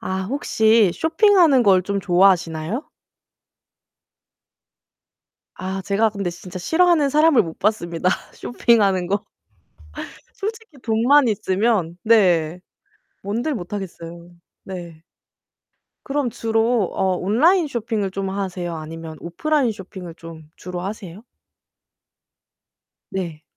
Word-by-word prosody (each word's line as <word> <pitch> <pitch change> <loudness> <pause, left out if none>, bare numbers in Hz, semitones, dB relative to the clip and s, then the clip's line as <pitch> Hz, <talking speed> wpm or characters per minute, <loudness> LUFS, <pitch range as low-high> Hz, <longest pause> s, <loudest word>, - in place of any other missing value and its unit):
아 190 0 -3
혹시 220 -4 +2
쇼핑하는 325 - +4
걸 190 -4 +4
좀 200 +2 -2
좋아하시나요? 180 - +1 2.7
아 190 +1 -4
제가 205 +3 +1
근데 200 -3 -3
진짜 175 +2 -9
싫어하는 320 - +3
사람을 305 -2 +4
못 165 -1 -9
봤습니다 180 -4 0 0.2
쇼핑하는 200 -7 +1
거. 200 +3 -1 1.1
솔직히 440 -6 -6
돈만 245 +5 +3
있으면 195 -3 0
네, 180 -7 +3 0.6
뭔들 235 +10 -2
못 180 -6 -7
하겠어요. 170 -3 -7 0.3
네. 170 -4 -9 1.0
그럼 275 -2 -1
주로 225 -1 +1
어 190 -1 0
온라인 305 - +3
쇼핑을 225 -6 -2
좀 195 0 -3
하세요? 185 -3 -4
아니면 160 0 -8
오프라인 265 - 0
쇼핑을 190 -4 -10
좀 165 -2 -12
주로 180 0 -7
하세요? 195 0 -7 1.9
네. 170 -5 -4
200 Hz, 225 characters per minute, -21 LUFS, 175-235 Hz, 2.7 s, 쇼핑하는